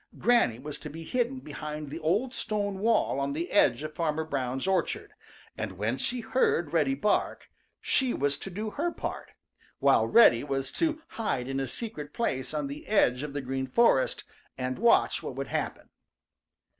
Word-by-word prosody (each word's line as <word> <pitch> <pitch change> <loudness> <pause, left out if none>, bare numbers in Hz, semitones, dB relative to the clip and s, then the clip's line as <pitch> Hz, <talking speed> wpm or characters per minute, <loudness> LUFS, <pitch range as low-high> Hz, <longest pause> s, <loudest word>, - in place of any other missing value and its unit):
Granny 235 - +3
was 145 +3 -7
to 150 - -7
be 165 +3 -8
hidden 250 +7 -1
behind 150 - -6
the 160 - -5
old 210 +11 0
stone 205 -5 -2
wall 220 -9 +2
on 140 0 -1
the 170 +4 -3
edge 140 -9 +4
of 155 0 -5
Farmer 160 -1 -1
Brown's 135 -4 -2
orchard, 190 -2 -1 0.4
and - - -4
when 105 +6 -1
she 245 - -2
heard 200 - +1
Reddy 145 -5 +2
bark, 205 +9 0 0.3
she 260 -2 +1
was 140 - 0
to - - -6
do 210 +4 -4
her 340 +8 -1
part, - - -6 0.4
while - - +4
Reddy 175 - +6
was 135 -2 -2
to 320 -1 -1
hide 135 - -2
in 135 0 -2
a 135 - -1
secret 150 - -6
place 130 - -1
on 150 -2 -2
the 140 +2 -7
edge 125 -12 +3
of 150 -1 -5
the 145 - -2
Green 130 0 -3
Forest 240 - +3 0.3
and 130 +2 -3
watch 235 +2 +4
what - - -6
would - - -4
happen. - - -3
155 Hz, 180 wpm, -28 LUFS, 135-220 Hz, 0.4 s, Reddy